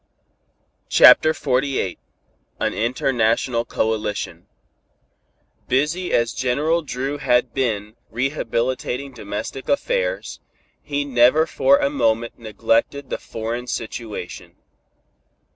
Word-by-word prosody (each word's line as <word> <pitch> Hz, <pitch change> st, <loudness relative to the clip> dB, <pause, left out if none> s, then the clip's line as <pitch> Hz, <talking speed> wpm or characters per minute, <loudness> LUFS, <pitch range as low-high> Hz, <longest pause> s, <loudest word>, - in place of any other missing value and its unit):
CHAPTER 155 Hz, -, +7 dB
XLVIII 135 Hz, -, -1 dB, 0.6 s
AN -, -, 0 dB
INTERNATIONAL 115 Hz, 0 st, 0 dB
COALITION 110 Hz, -2 st, -2 dB, 1.2 s
Busy 155 Hz, +7 st, 0 dB
as 115 Hz, -1 st, +1 dB
General 150 Hz, +7 st, +1 dB
Dru 135 Hz, 0 st, -4 dB
had 125 Hz, -3 st, +2 dB
been 110 Hz, -5 st, -2 dB
rehabilitating 130 Hz, +1 st, -2 dB
domestic 110 Hz, +3 st, -6 dB
affairs, -, -, -1 dB, 0.4 s
he 145 Hz, -1 st, -2 dB
never 130 Hz, +4 st, +4 dB
for 280 Hz, -, +3 dB
a 285 Hz, -1 st, 0 dB
moment 115 Hz, -, 0 dB
neglected 115 Hz, +5 st, -1 dB
the -, -, -2 dB
foreign 115 Hz, +2 st, -5 dB
situation. 115 Hz, -5 st, -6 dB
125 Hz, 90 wpm, -21 LUFS, 115-145 Hz, 1.2 s, CHAPTER